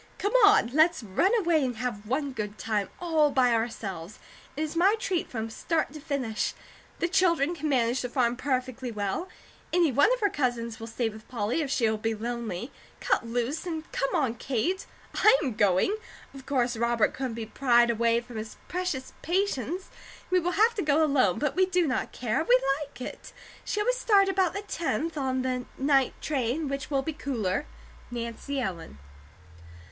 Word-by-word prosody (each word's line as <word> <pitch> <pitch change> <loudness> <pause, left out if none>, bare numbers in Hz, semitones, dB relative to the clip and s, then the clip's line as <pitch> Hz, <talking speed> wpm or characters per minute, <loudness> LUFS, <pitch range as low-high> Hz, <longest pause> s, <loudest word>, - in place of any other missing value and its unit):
Come 405 +2 -1
on! 410 - +6
Let's 315 -2 +4
run 210 - +2
away 340 -7 +2
and 250 -2 -1
have 220 -3 -4
one 275 +4 -1
good 210 -4 -5
time 210 -3 -1
all 320 -4 +3
by 255 -3 +3
ourselves. 215 -5 -3 0.4
It 310 - 0
is 310 +1 -4
my 380 +5 +4
treat 375 -5 -2
from 225 -2 -4
start 315 +3 -1
to 305 - -8
finish. 265 -7 -2 0.4
The 340 - 0
children 345 -4 +2
can 310 -2 -3
manage 245 -2 +2
the 250 - -3
farm 240 -2 +1
perfectly 255 -1 -2
well. 210 - -3 0.4
Any 340 -4 +3
one 285 - +4
of - - -12
her 410 - +3
cousins 240 -3 -1
will 225 - -7
stay 230 +1 -1
with 215 0 -12
Polly, 235 +5 -1
if 290 - -2
she 245 -4 +2
will 220 0 0
be 225 +1 -1
lonely. 235 0 -4 0.3
Cut 235 - 0
loose 245 +9 -2
and 320 -2 -5
come 275 - -1
on, 260 -7 +1
Kate. 275 - -1 0.3
I 435 +3 +6
am 260 -5 -1
going. 205 - +3 0.4
Of 270 -1 -12
course 250 -3 +1
Robert 235 0 +2
couldn't 260 -4 -3
be 230 -1 -4
pried 240 0 +3
away 230 +1 +2
from 240 -1 -10
his 215 0 -6
precious 355 -7 -3
patients; 360 - -1 0.4
we 365 - +5
will 355 +1 -1
have 445 +4 +4
to 415 - -2
go 305 0 +3
alone; 260 - +3
but 295 -2 -1
we 375 +1 +4
do 365 -2 +2
not 260 -4 -1
care. 245 +5 -1
We 255 -5 +5 0.2
like 280 -4 -13
it. - - -8 0.3
Shall 420 0 -1
we - - +4
start 415 -5 +3
about 380 -2 +2
the 400 - -4
tenth, 330 -3 -2
on 260 -3 -1
the 255 -1 -2
night 270 -1 +2
train, 280 +1 -1
which 275 -1 -4
will 275 -2 +1
be 320 - -3
cooler? 245 -5 -2 0.4
NANCY 240 +4 -4
ELLEN. 170 - -4
265 Hz, 185 wpm, -28 LUFS, 230-320 Hz, 0.4 s, on